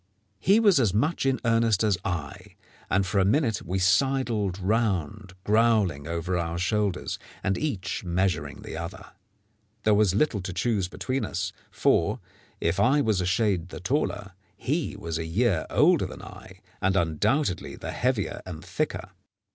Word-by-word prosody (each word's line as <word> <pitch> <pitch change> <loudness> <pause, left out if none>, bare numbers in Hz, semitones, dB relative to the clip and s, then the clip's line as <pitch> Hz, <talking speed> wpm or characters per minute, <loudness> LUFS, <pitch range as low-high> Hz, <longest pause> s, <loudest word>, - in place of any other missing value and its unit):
He 195 - +4
was 205 -9 +5
as 105 -6 +2
much 145 +5 +1
in 135 -1 +1
earnest 115 -3 +3
as 105 -2 +3
I, 80 -6 -5 0.3
and 95 +1 +2
for 100 +2 0
a - - +4
minute 110 +1 +2
we 90 +3 -3
sidled 105 0 +1
round 100 -2 -1
growling 105 -9 +2
over 85 +2 -2
our 85 0 -2
shoulders, 100 +1 -1 0.2
and 95 - +1
each 105 -14 -3
measuring 90 -5 -1
the - - -7
other. 95 +4 -7 0.7
There 110 - +4
was 100 -3 +3
little 110 -4 +1
to 95 0 -5
choose 105 -2 0
between 130 +8 -3
us, 95 +1 -3 0.2
for, - - +2 0.4
if 85 +1 0
I 135 +4 +4
was 110 -7 +1
a 90 - -1
shade 95 -2 +1
the - - -8
taller, 100 -2 -1 0.3
he - - -2
was 85 -1 -4
a 80 - -3
year 100 0 +1
older - - +4
than - - -10
I, - - -12 0.2
and 95 +1 +2
undoubtedly 90 - 0
the - - -6
heavier 125 -5 -1
and 90 -1 -8
thicker. 85 - -3
95 Hz, 160 wpm, -26 LUFS, 90-115 Hz, 0.7 s, was